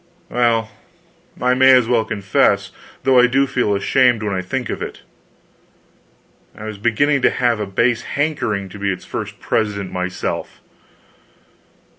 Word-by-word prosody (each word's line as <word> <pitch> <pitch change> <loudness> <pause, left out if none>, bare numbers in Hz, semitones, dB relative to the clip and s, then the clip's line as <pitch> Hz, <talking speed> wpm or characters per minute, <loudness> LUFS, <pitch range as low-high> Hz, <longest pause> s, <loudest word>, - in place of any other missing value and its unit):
Well, 115 -2 +1 0.7
I 125 +1 +2
may 130 +1 +6
as 125 -3 +4
well 115 -2 +2
confess, 100 -2 +1 0.3
though 130 -2 +5
I 125 - +6
do 135 +3 +2
feel 125 -6 0
ashamed 120 +2 +2
when 105 -2 -2
I 95 - -1
think 125 +6 -4
of - - -5
it: - - -7 1.5
I - - -10
was 110 -2 -7
beginning 140 +6 +1
to - - +4
have 120 -3 0
a 105 - -3
base 115 +4 +1
hankering 130 -10 -2
to 105 - -11
be 100 0 0
its 90 -1 -6
first - - -6
president 100 -3 -2
myself. 90 0 -4
115 Hz, 150 wpm, -19 LUFS, 100-125 Hz, 1.5 s, may